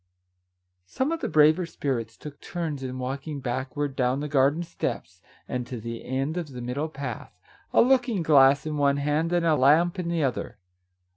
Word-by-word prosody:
Some 260 Hz, -, -1 dB
of 330 Hz, -, -1 dB
the -, -, -2 dB
braver 155 Hz, +3 st, +4 dB
spirits 120 Hz, -8 st, -3 dB
took 145 Hz, -1 st, -10 dB
turns 160 Hz, -5 st, -4 dB
in 130 Hz, -1 st, -5 dB
walking 135 Hz, +3 st, -4 dB
backward 130 Hz, +2 st, -3 dB
down 130 Hz, 0 st, +1 dB
the 150 Hz, -, -3 dB
garden 145 Hz, +3 st, +2 dB
steps, 95 Hz, -, -5 dB, 0.3 s
and 125 Hz, -1 st, -3 dB
to 125 Hz, -, -6 dB
the 115 Hz, +1 st, -6 dB
end 135 Hz, +6 st, -2 dB
of 175 Hz, -3 st, -3 dB
the 125 Hz, -, -7 dB
middle 140 Hz, +6 st, -3 dB
path, 140 Hz, -6 st, -7 dB, 0.3 s
a -, -, +5 dB
looking 245 Hz, -7 st, +2 dB
glass 140 Hz, -2 st, +5 dB
in 155 Hz, -1 st, -3 dB
one 140 Hz, -1 st, +2 dB
hand 150 Hz, +4 st, 0 dB
and 175 Hz, -1 st, +1 dB
a 160 Hz, -2 st, +4 dB
lamp 160 Hz, +7 st, +4 dB
in 175 Hz, -, -3 dB
the 170 Hz, -2 st, 0 dB
other. 130 Hz, -5 st, -2 dB
145 Hz, 185 wpm, -26 LUFS, 130-165 Hz, 0.3 s, a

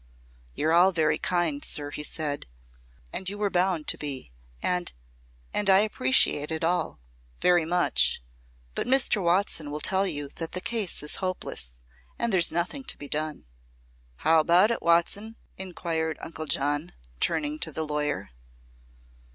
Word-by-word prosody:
"You're 160 Hz, +2 st, +1 dB
all 180 Hz, +3 st, +6 dB
very 160 Hz, -4 st, +1 dB
kind, 170 Hz, -5 st, 0 dB
sir," 145 Hz, -1 st, 0 dB
he 150 Hz, -, -3 dB
said, 150 Hz, -2 st, -3 dB, 0.7 s
"as 190 Hz, -, -1 dB
you 205 Hz, -, -6 dB
were 205 Hz, -1 st, -1 dB
bound 180 Hz, -3 st, +1 dB
to -, -, -1 dB
be. 140 Hz, -, -4 dB, 0.3 s
And 180 Hz, -, 0 dB, 0.6 s
and 205 Hz, -1 st, +1 dB
I 190 Hz, +1 st, +7 dB
appreciate 145 Hz, -6 st, +3 dB
it 160 Hz, 0 st, -2 dB
all 175 Hz, -, 0 dB, 0.4 s
very 175 Hz, -2 st, +4 dB
much. 175 Hz, +2 st, +2 dB, 0.5 s
But -, -, -3 dB
Mr. 250 Hz, -5 st, +3 dB
Watson 170 Hz, -3 st, 0 dB
will 150 Hz, +1 st, -4 dB
tell 190 Hz, +5 st, +1 dB
you 145 Hz, -5 st, -2 dB
that 165 Hz, -1 st, -4 dB
the 185 Hz, -, -1 dB
case 210 Hz, -6 st, -1 dB
is 150 Hz, -, -2 dB
hopeless, 120 Hz, -, -3 dB, 0.4 s
and 235 Hz, -2 st, 0 dB
there's 175 Hz, -3 st, +5 dB
nothing 175 Hz, -, -2 dB
to -, -, -3 dB
be 145 Hz, -, -8 dB
done." 155 Hz, -, -2 dB, 0.7 s
"How 160 Hz, -, +3 dB
about 175 Hz, +7 st, +5 dB
it, 235 Hz, -, -2 dB
Watson?" 185 Hz, +6 st, +1 dB, 0.2 s
inquired 165 Hz, -4 st, -2 dB
Uncle 160 Hz, -1 st, -6 dB
John, 145 Hz, +3 st, 0 dB, 0.3 s
turning 300 Hz, +1 st, 0 dB
to -, -, 0 dB
the 160 Hz, -, -2 dB
lawyer. 150 Hz, -, -2 dB
170 Hz, 150 wpm, -27 LUFS, 150-190 Hz, 0.7 s, I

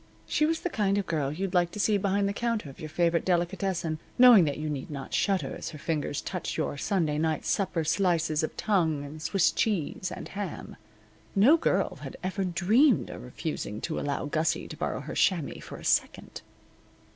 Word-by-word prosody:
She 305 Hz, -, +2 dB
was 325 Hz, 0 st, -1 dB
the 355 Hz, -, -1 dB
kind 200 Hz, -5 st, +1 dB
of 200 Hz, -, 0 dB
girl 150 Hz, -5 st, -1 dB
you'd 185 Hz, +4 st, -3 dB
like 175 Hz, -2 st, +3 dB
to 210 Hz, -, -6 dB
see 210 Hz, +1 st, +3 dB
behind 200 Hz, +1 st, +1 dB
the 200 Hz, -, -1 dB
counter 230 Hz, -9 st, -2 dB
of -, -, -18 dB
your 155 Hz, -, -6 dB
favorite 170 Hz, +1 st, +1 dB
delicatessen, 175 Hz, -2 st, -1 dB, 0.2 s
knowing 245 Hz, -8 st, +8 dB
that 145 Hz, -, -2 dB
you 155 Hz, +1 st, -3 dB
need 145 Hz, -3 st, -4 dB
not 140 Hz, -3 st, -7 dB
shudder 195 Hz, -2 st, 0 dB
as -, -, -6 dB
her 160 Hz, -, -9 dB
fingers 150 Hz, -1 st, -2 dB
touch 180 Hz, -2 st, -4 dB
your 155 Hz, -, -1 dB
Sunday 155 Hz, -1 st, 0 dB
night 160 Hz, -1 st, 0 dB
supper 185 Hz, -4 st, 0 dB
slices 160 Hz, -2 st, +1 dB
of 155 Hz, -, -4 dB
tongue, 160 Hz, -9 st, +1 dB
and 155 Hz, +2 st, -9 dB
Swiss 195 Hz, +3 st, +2 dB
cheese, 205 Hz, -, -1 dB
and -, -, -7 dB
ham. 200 Hz, 0 st, -6 dB, 0.6 s
No 225 Hz, +11 st, +7 dB
girl 330 Hz, -, 0 dB
had -, -, -8 dB
ever 190 Hz, +1 st, -1 dB
dreamed 200 Hz, -, +3 dB
of -, -, -8 dB
refusing 100 Hz, -, -5 dB
to 160 Hz, -, -2 dB
allow 145 Hz, -1 st, -2 dB
Gussie 160 Hz, +3 st, 0 dB
to -, -, -7 dB
borrow 130 Hz, -, -3 dB
her 145 Hz, -, -7 dB
chamois 170 Hz, -7 st, +1 dB
for -, -, -9 dB
a -, -, -11 dB
second. -, -, 0 dB
175 Hz, 195 wpm, -28 LUFS, 155-200 Hz, 0.6 s, knowing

